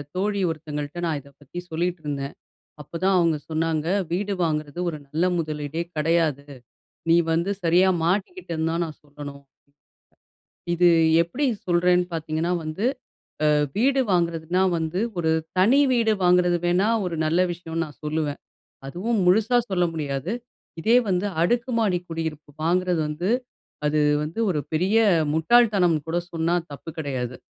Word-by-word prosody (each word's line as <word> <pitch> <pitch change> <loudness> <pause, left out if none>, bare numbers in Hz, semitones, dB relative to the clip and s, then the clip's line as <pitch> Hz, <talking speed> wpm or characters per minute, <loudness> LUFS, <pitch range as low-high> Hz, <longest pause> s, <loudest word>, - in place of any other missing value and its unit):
தோழி 200 +2 0
ஒருத்தங்கள்ட்ட 150 0 -5
நான் 155 -3 -1
இத 140 - -17
பத்தி 145 +5 -8
சொல்லிட்டுருந்தேன். 155 -5 -3 0.5
அப்பதான் 185 +6 0
அவங்க 165 -3 +3
சொன்னாங்க, 160 -1 0 0.3
"வீடு 200 +3 -1
வாங்குறது 150 0 -2
ஒரு 155 - -7
நல்ல 155 +5 0
முதலீடே 155 0 -3
கெடையாது. 155 -2 +1 0.6
நீ 165 - +6 0.2
வந்து 170 +4 0
சரியா 175 +3 +4 0.2
மாட்டிக்கிட்டேன்னு 175 - -1
தான் 170 +1 0
நான் 155 - -11
சொல்லணும்." 145 -1 -10 1.3
இது 175 +1 +3 0.4
எப்டி 245 +13 -3 0.2
சொல்றேன்னு 180 0 +3
பார்த்தீங்கன்னா 160 +1 -2
வந்து, 155 +7 -4 0.6
அ - - +4 0.3
வீடு 265 +5 +3
வாங்குறதுன்னா 170 0 +1 0.2
வந்து 160 +3 -2 0.2
ஒரு 160 -2 +1 0.3
தனி 230 +10 +5
வீடு 230 -3 +3
வாங்குறது 180 -1 +4
வேணா 180 +4 +2 0.2
ஒரு 175 -2 -3
நல்ல 160 +3 +2
விஷயம்னு 165 -1 -4
நான் 150 -2 -13
சொல்லுவேன். 150 -1 -2 0.5
அதுவும் 200 +10 -1
முழுசா 220 +6 +4
சொல்ல 180 -2 +2
முடியாது. 145 +2 -3 0.5
இதே 225 +8 +4
வந்து 185 +1 +1 0.2
அடுக்குமாடி 230 -2 +1
குடியிருப்பு 160 -2 -5
வாங்குறது 180 0 +1
வந்து, 165 +6 -2 0.6
அது 150 +1 +2 0.2
வந்து 160 +7 -7
ஒரு 155 -5 0
பெரிய 185 +7 +1 0.4
முட்டாள்தனம்னு 180 -3 +4
கூட 170 +2 0
சொன்னா 165 +1 +1 0.2
தப்பு 145 +3 -8
கெடையாது. 130 -5 -3
170 Hz, 130 wpm, -24 LUFS, 155-185 Hz, 1.3 s, நீ